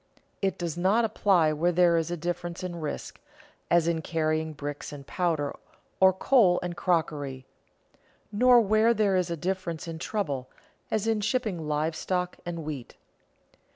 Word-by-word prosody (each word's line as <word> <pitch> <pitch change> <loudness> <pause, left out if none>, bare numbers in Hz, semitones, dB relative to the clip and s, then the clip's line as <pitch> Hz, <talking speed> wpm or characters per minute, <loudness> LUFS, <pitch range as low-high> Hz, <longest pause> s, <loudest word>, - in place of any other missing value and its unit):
It 195 -1 0
does 175 -1 -4
not 205 +6 +3
apply 190 -7 +3
where 170 +4 +1
there 175 -1 +4
is 165 -1 0
a 175 - -3
difference 175 +1 -4
in 175 -2 -4
risk, 150 - -5 0.5
as 170 -1 +4
in 165 -1 0
carrying 155 -1 -1
bricks 145 -1 -6
and 140 -2 -9
powder, 160 -5 -1 0.4
or 190 0 +7
coal 190 -2 +4
and 175 -1 -4
crockery; 145 -7 -1 0.9
nor 245 +3 +6
where 215 +2 +3
there 205 -3 +2
is 180 -1 +1
a 170 - -2
difference 175 -1 -3
in 165 -1 -6
trouble, 145 -11 -3 0.4
as 215 -1 0
in 225 -2 +1
shipping 210 -8 -1
live 155 +2 0
stock 180 0 -2
and 170 -2 -4
wheat. 145 -6 -6
175 Hz, 155 wpm, -27 LUFS, 155-190 Hz, 0.9 s, or